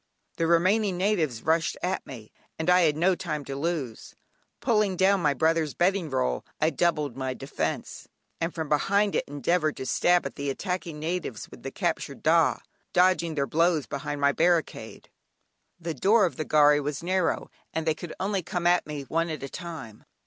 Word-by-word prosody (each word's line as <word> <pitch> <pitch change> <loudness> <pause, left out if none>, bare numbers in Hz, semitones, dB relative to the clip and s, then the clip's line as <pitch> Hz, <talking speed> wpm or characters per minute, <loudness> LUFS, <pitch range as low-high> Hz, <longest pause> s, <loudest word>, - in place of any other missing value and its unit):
The 165 - +1
remaining 185 +3 +3
natives 170 - 0
rushed 160 +1 +1
at 185 +1 -2
me, 115 -5 -10 0.3
and 160 +3 +1
I 180 0 +6
had 155 -3 +3
no 180 +4 +3
time 150 -4 -4
to 135 - -5
lose. 140 -6 -4 0.4
Pulling 210 -6 +1
down 190 +1 +3
my 145 -3 +2
brother's 160 -2 +1
bedding 180 -2 +1
roll, 65 - -1 0.2
I 155 +1 +2
doubled 150 -4 0
my 130 -1 -3
defence, 135 - -4 0.3
and 165 +1 -1
from 160 -2 -4
behind 200 +7 +2
it - - 0
endeavoured 155 +3 0
to 130 - -5
stab 175 +7 +2
at - - -6
the 140 -1 -2
attacking 175 +1 -3
natives 160 - -4
with - - -12
the - - -5
captured - - -3
"dah," - - +3 0.3
dodging 175 -3 +3
their 140 -2 +1
blows 165 -1 +2
behind 140 +3 -4
my 140 0 +4
barricade. 170 0 -1 0.7
The 165 -1 -4
door 200 - +4
of 175 - -3
the 155 - -3
gharry 150 -1 +5
was 145 +1 -4
narrow, 185 0 0 0.2
and 160 0 -3
they 160 - +2
could 165 +2 -8
only 195 0 0
come 175 +1 -4
at 175 -1 +3
me 150 -2 -5
one 165 +4 -1
at 155 -3 -5
a 140 - -5
time. 160 - -8
165 Hz, 185 wpm, -27 LUFS, 145-180 Hz, 0.7 s, I